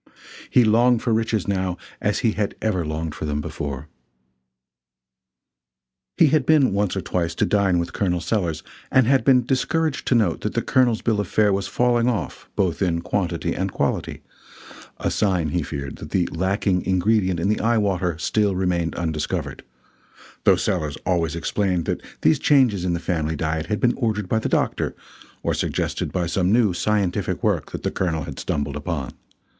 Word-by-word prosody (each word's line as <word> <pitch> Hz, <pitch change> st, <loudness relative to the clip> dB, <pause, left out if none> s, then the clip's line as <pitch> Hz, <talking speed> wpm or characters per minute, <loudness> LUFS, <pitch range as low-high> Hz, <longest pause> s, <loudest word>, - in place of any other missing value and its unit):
He 125 Hz, -, +5 dB
longed 115 Hz, +2 st, +3 dB
for 120 Hz, -, +1 dB
riches 110 Hz, -3 st, 0 dB
now 95 Hz, -2 st, -1 dB, 0.2 s
as 105 Hz, -, +1 dB
he 115 Hz, -, +4 dB
had 105 Hz, -1 st, -2 dB
never 100 Hz, -6 st, 0 dB
longed 80 Hz, 0 st, -3 dB
for -, -, -5 dB
them 75 Hz, -1 st, -1 dB
before. 70 Hz, -1 st, -5 dB, 2.3 s
He 160 Hz, -, +6 dB
had 150 Hz, -1 st, +3 dB
been 140 Hz, -5 st, +4 dB
once 100 Hz, -1 st, 0 dB
or 95 Hz, -, -1 dB
twice 85 Hz, -2 st, -2 dB
to -, -, +1 dB
dine 100 Hz, -3 st, +2 dB
with 85 Hz, 0 st, -2 dB
Col. 90 Hz, -3 st, 0 dB
Sellers, 85 Hz, -3 st, -1 dB, 0.3 s
and 130 Hz, -2 st, +5 dB
had 135 Hz, +2 st, +3 dB
been 125 Hz, -3 st, +4 dB
discouraged 155 Hz, +4 st, 0 dB
to 125 Hz, -, +3 dB
note 115 Hz, -3 st, +1 dB
that 105 Hz, -, -3 dB
the 115 Hz, -, 0 dB
Colonel's 120 Hz, -4 st, +2 dB
bill 110 Hz, -3 st, +1 dB
of 105 Hz, -, -1 dB
fare 105 Hz, +1 st, +3 dB
was 95 Hz, 0 st, -1 dB
falling 120 Hz, +3 st, +2 dB
off 115 Hz, -4 st, -4 dB
both 90 Hz, -4 st, 0 dB
in 85 Hz, -3 st, +1 dB
quantity 90 Hz, 0 st, -1 dB
and -, -, -2 dB
quality -, -, -2 dB, 0.7 s
a -, -, -1 dB
sign, 90 Hz, -6 st, +1 dB
he 90 Hz, +3 st, 0 dB
feared, 70 Hz, -2 st, -5 dB
that -, -, -9 dB
the 90 Hz, -2 st, +1 dB
lacking 95 Hz, +1 st, 0 dB
ingredient 95 Hz, 0 st, +1 dB
in 85 Hz, -, 0 dB
the 105 Hz, -, +1 dB
eye 115 Hz, +1 st, +2 dB
water 90 Hz, -5 st, 0 dB
still 100 Hz, +3 st, +1 dB
remained 90 Hz, -3 st, 0 dB
undiscovered 80 Hz, -3 st, -3 dB, 0.8 s
though -, -, +7 dB
Sellers 75 Hz, -2 st, -1 dB
always 85 Hz, -3 st, 0 dB
explained 90 Hz, +1 st, -1 dB
that -, -, -2 dB, 0.2 s
these 155 Hz, -, +3 dB
changes 125 Hz, -12 st, +3 dB
in 90 Hz, -, 0 dB
the 85 Hz, -, -1 dB
family 80 Hz, -3 st, -1 dB
diet 80 Hz, +1 st, -2 dB
had 105 Hz, -1 st, -1 dB
been 120 Hz, 0 st, +3 dB
ordered 105 Hz, -5 st, -1 dB
by 110 Hz, -, +1 dB
the -, -, -2 dB
doctor, -, -, 0 dB, 0.5 s
or -, -, 0 dB
suggested -, -, -2 dB
by 90 Hz, -2 st, -1 dB
some 90 Hz, +2 st, +1 dB
new 110 Hz, -4 st, +3 dB
scientific 100 Hz, 0 st, -1 dB
work -, -, 0 dB
the -, -, -2 dB
Colonel 80 Hz, -4 st, -1 dB
had -, -, -7 dB
stumbled 70 Hz, -1 st, -2 dB
upon. 75 Hz, -4 st, -3 dB
95 Hz, 180 wpm, -23 LUFS, 85-110 Hz, 2.3 s, though